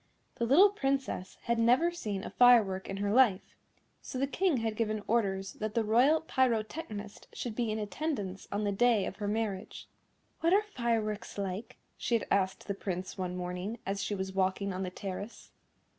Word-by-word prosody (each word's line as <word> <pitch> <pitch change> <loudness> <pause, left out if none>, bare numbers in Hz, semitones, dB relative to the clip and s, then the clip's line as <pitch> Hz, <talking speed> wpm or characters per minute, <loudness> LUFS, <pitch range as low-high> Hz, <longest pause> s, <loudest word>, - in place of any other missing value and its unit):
The 235 - 0
little 370 - +7
Princess 270 - -2
had 235 -1 0
never 250 +9 +4
seen 210 - -4
a - - -6
firework 220 -7 +5
in 195 - -3
her 200 0 -1
life, 235 -7 +3 0.5
so - - -6
the 270 - +2
King 335 +2 +1
had 225 -2 -1
given 215 -2 -1
orders 195 -4 0
that 215 +1 -4
the 230 - +2
Royal 250 +9 +4
Pyrotechnist 230 -5 -2
should 240 - -4
be 235 -2 0
in 215 - -1
attendance 210 -4 -3
on 205 +1 -1
the 205 - +1
day 220 0 +3
of 190 - -6
her 205 -1 -3
marriage. 210 -2 -3 0.5
"What 335 +2 +3
are 410 +2 +5
fireworks 230 - -2
like?" 195 +2 -4 0.2
she 235 - +1
had - - -6
asked 190 -1 +1
the 200 - -1
Prince, 185 -2 -4
one 180 -1 -3
morning, 180 +5 -4
as 195 +1 -2
she 205 - -2
was 190 0 -4
walking 190 +1 0
on 185 - -4
the 185 - -2
terrace. 195 +4 -7
215 Hz, 185 wpm, -31 LUFS, 195-245 Hz, 0.5 s, little